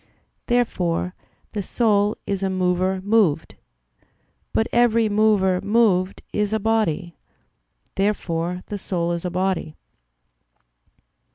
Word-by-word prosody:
Therefore 180 -8 0 0.4
the 210 - -3
soul 210 0 +1
is 195 -1 -2
a 195 - 0
mover 185 0 0
moved. 200 -7 +2 1.0
But 225 - +1
every 230 -2 +3
mover 205 -3 +3
moved 200 -3 +2
is 210 0 0
a 220 - +1
body. 195 -6 0 0.8
Therefore 180 -3 -1
the 205 - -5
soul 175 -2 -2
is 170 +1 -3
a - - 0
body. 185 -3 -1
195 Hz, 105 wpm, -22 LUFS, 180-215 Hz, 1.0 s, every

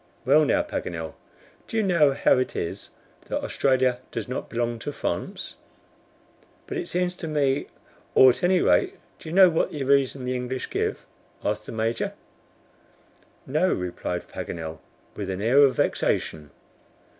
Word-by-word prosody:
Well 150 +4 +5
now, - - +2
Paganel, 80 -2 -5 0.5
do 225 - -3
you 220 - +3
know 170 -7 +4
how 135 - +3
it 130 - -2
is 85 - -4 0.4
that - - -2
Australia 130 -2 +2
does - - -4
not 125 - -4
belong 120 0 -2
to 145 - -4
France?" - - -4 1.1
"But 400 -2 -4
it 355 - -4
seems 180 0 0
to 165 - -5
me 145 -3 +1 0.2
" - - -31
"Or, 130 -1 +9
at - - -7
any 180 0 +3
rate, 390 0 +3 0.2
do 160 - -9
you 165 - -4
know 190 -2 +8
what's 160 - 0
the 145 - -3
reason 135 -1 +2
the 125 0 -1
English 125 +1 -4
give?" - - -2 0.4
asked - - -2
the - - -6
Major. 115 +1 -1 1.3
"No," 155 +7 +1
replied 90 -1 -3
Paganel, 80 -2 -6 0.4
with 100 -2 -4
an 95 0 -3
air 120 +7 +4
of 140 -2 +6
vexation. 75 -2 0
130 Hz, 160 wpm, -25 LUFS, 115-160 Hz, 1.3 s, Or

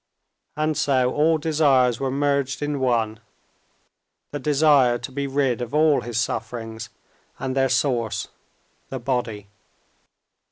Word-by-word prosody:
And 155 0 0
so 130 -3 +1
all 160 +2 +3
desires 140 -6 +2
were 135 - -1
merged 140 0 0
in 145 -1 -2
one—the 115 -4 0 1.2
desire 140 -4 +4
to 125 - -8
be 140 +1 -3
rid 135 -3 0
of 120 +3 -4
all 155 -1 +4
his 120 -1 -3
sufferings 115 -2 -4 0.5
and 135 -1 -3
their 135 -1 +2
source, 125 -3 0 0.6
the 135 - -4
body. 120 -5 -3
130 Hz, 120 wpm, -23 LUFS, 120-145 Hz, 1.2 s, desire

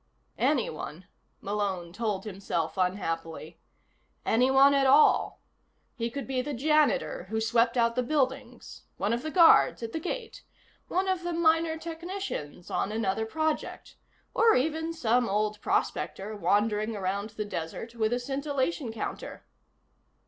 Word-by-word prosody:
Anyone, 185 - -1 0.4
Malone 195 -4 -3
told 210 -2 -2
himself 190 -5 -3
unhappily. 170 -4 -3 0.7
Anyone 265 +4 +5
at 275 -1 +3
all. 280 +3 +4 0.5
He 230 -1 -3
could 275 +3 -5
be 260 -1 -1
the 290 +1 -4
janitor 300 - +1
who 220 +1 -1
swept 230 +2 +2
out 230 -1 +3
the 250 - 0
buildings, 260 -3 -2 0.2
one 205 +4 0
of 240 - -1
the 310 - -4
guards 330 -7 +5
at 225 - -5
the - - -2
gate, 465 +8 -5 0.5
one 375 +2 0
of 375 -2 0
the 350 0 -3
minor 325 -1 +2
technicians 330 - -6
on 205 - -1
another 220 0 -1
project, 315 +5 -3 0.4
or 455 -1 +5
even 320 +4 0
some 245 -6 +1
old 210 +1 -1
prospector 220 - -2
wandering 210 +2 +1
around 200 +2 -2
the 210 - -2
desert 205 +5 -6
with 220 -1 0
a 245 - +1
scintillation 275 +1 -2
counter. 225 - -6
235 Hz, 135 wpm, -28 LUFS, 210-305 Hz, 0.7 s, Anyone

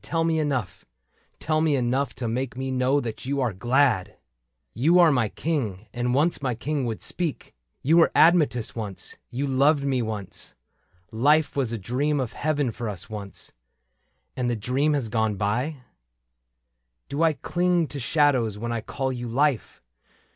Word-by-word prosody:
Tell 165 -1 -1
me 165 -1 +1
enough 135 - -2 0.3
— - - -40
tell 155 0 0
me 155 -2 +2
enough 130 +2 0
to 120 - -3
make 125 +2 -3
Me 130 0 -3
know 130 +2 +2
that 120 -1 -6
you 140 +1 -1
are 125 -5 0
glad! 120 0 +2
^^ - - -23 0.6
You 160 +9 +3
are 170 -3 +7
my 125 -6 +1
King, 115 - -3
and 125 +1 0
once 155 +4 +1
my 130 -3 -1
King 140 +3 -2
would 110 -2 -4
speak: 170 -5 -3 0.3
You 160 +5 +4
were 165 - +5
Admetus 155 -9 +4
once, 105 -5 -6
you 130 +4 -2
loved 140 +2 +3
me 135 -3 0
once: 110 -4 -6 0.6
Life 145 +7 +3
was 135 -5 0
a 115 - -2
dream 135 +8 -1
of 125 -4 -3
heaven 145 -4 0
for 115 0 -5
us 105 +2 -7
once 100 -2 -7 0.4
— - - -48
And 125 -1 -1
has 120 - -1
the - - -11
dream 135 +7 +1 0.2
gone 110 -2 +1
by? 120 +10 -1
^^ - - -22 1.3
Do 140 +3 -3
I 165 -1 +4
cling 175 +4 +1
to 145 - -5
shadows 130 -6 +2
when 120 +2 -4
I 115 -1 -2
call 130 +2 -3
you 120 -1 -5
Life 135 +1 0
130 Hz, 180 wpm, -25 LUFS, 115-150 Hz, 1.3 s, are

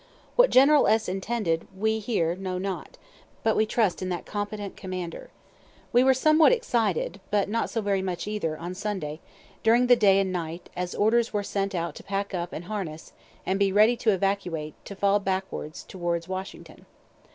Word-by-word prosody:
What - - +6
General 280 +3 +6
S. 220 0 +3
intended 190 -3 -1
we 220 +2 +1
here 190 -7 0
know 185 -1 -4
not, 190 0 -5 0.5
but 220 - +2
we 215 - +2
trust 215 -5 +1
in 185 - -2
that 175 -1 -3
competent 205 -1 -4
commander. 185 -3 -6 0.6
We 245 +1 +6
were 265 0 +5
somewhat 310 - +5
excited, 225 - 0
(but 205 -1 +1
not 230 +3 -1
so 225 - -2
very 200 -2 0
much 185 -2 -3
either,) 185 -7 -2
on 175 +3 -6
Sunday, 185 -6 -4 0.4
during 235 +3 +4
the 245 0 +7
day 200 -4 +5
and 190 -1 0
night, 170 -1 -5
as 180 0 -3
orders 230 +3 +2
were 205 -1 0
sent 195 -1 -2
out 170 0 -2
to - - -11
pack 200 0 -3
up 175 -1 -3
and 170 - -6
harness, 175 -6 -6 0.3
and 190 +1 0
be 200 -1 +3
ready 215 +4 +5
to 230 - +1
evacuate, 185 -6 -1
to 200 - -8
fall 200 +1 +3
back 190 -1 -1 0.4
towards 170 -2 -3
Washington. 190 +1 -7
195 Hz, 180 wpm, -26 LUFS, 180-220 Hz, 0.6 s, the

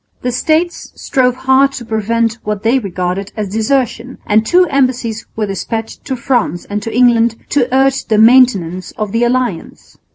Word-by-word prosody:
The 250 - -1
States 315 +7 -1
strove 250 -2 0
hard 265 +1 +2
to 250 -3 -7
prevent 230 +1 -1
what 210 -1 -4
they 240 +4 +2
regarded 190 -2 -4
as 210 -2 -3
desertion, 245 +2 -1
and 215 +1 +2
two 360 +9 +3
embassies 255 -6 -1
were 220 - -1
despatched 215 +3 -5
to 265 - -3
France 235 -8 -1
and 205 +1 -4
to 225 - -5
England 235 -1 +3
to 260 -3 0
urge 270 +1 +2
the 220 - +1
maintenance 215 -7 +3
of 210 -2 -3
the 230 +2 0
alliance. 240 -7 -3
230 Hz, 165 wpm, -15 LUFS, 215-260 Hz, -, two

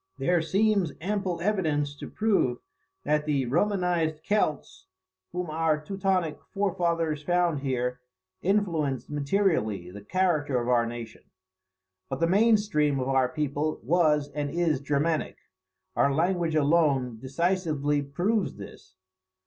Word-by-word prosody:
There 175 -1 +2
seems 195 0 +1
ample 190 -1 -2
evidence 155 -8 0
to - - -8
prove 195 - +1 0.5
that 150 0 +1
the 140 -3 +1
Romanized 170 0 0
Celts, 150 - -1 0.4
whom 180 -2 -4
our 160 -1 +1
Teutonic 185 -1 -1
forefathers 170 -6 0
found 175 -1 +1
here, 125 -2 -2 0.4
influenced 165 - 0
materially 140 - 0
the 100 +2 -9
character 150 - +1
of 120 +1 -3
our 120 -1 +3
nation. 115 -1 -8 0.8
But 135 - -3
the 165 - +3
main 215 +6 +4
stream 150 -9 0
of 130 +1 -2
our 130 -2 +2
people 150 +1 -2
was 150 0 +2
and 145 0 -3
is 160 -3 0
Germanic. 150 +3 0 0.6
Our 140 - +3
language 170 +2 +1
alone 140 -6 +2
decisively 150 0 0
proves 180 +10 -1
this. 100 -2 -12
155 Hz, 125 wpm, -27 LUFS, 140-180 Hz, 0.8 s, main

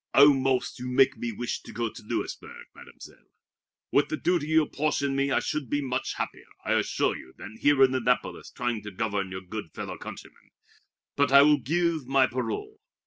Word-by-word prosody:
"Almost 135 -3 +4
you 125 - -5
make 135 +1 +4
me 120 - -4
wish 120 +2 -4
to - - -11
go 120 0 -2
to - - -10
Louisburg, 105 - -5
Mademoiselle. - - -15 0.6
With 140 - +3
the 155 - -2
duty 175 -4 0
you 160 0 +4
apportion 140 -2 -1
me 140 0 +1
I - - +2
should 145 -6 -3
be 145 - 0
much 130 -2 -2
happier, - - -5 0.2
I - - +1
assure - - +1
you, 65 - -12
than 105 +3 -10
here 145 -2 +5
in 130 0 +4
Annapolis 130 -2 -1
trying 120 -3 -3
to 105 - -7
govern 100 -1 -2
your 95 0 -6
good 95 -1 -7
fellow - - -6
countrymen. - - -11 0.7
But 140 -1 +2
I 140 +1 +9
will 150 0 +5
give 160 +2 0
my 135 0 +4
parole. 120 -4 -4
135 Hz, 190 wpm, -27 LUFS, 115-145 Hz, 0.7 s, I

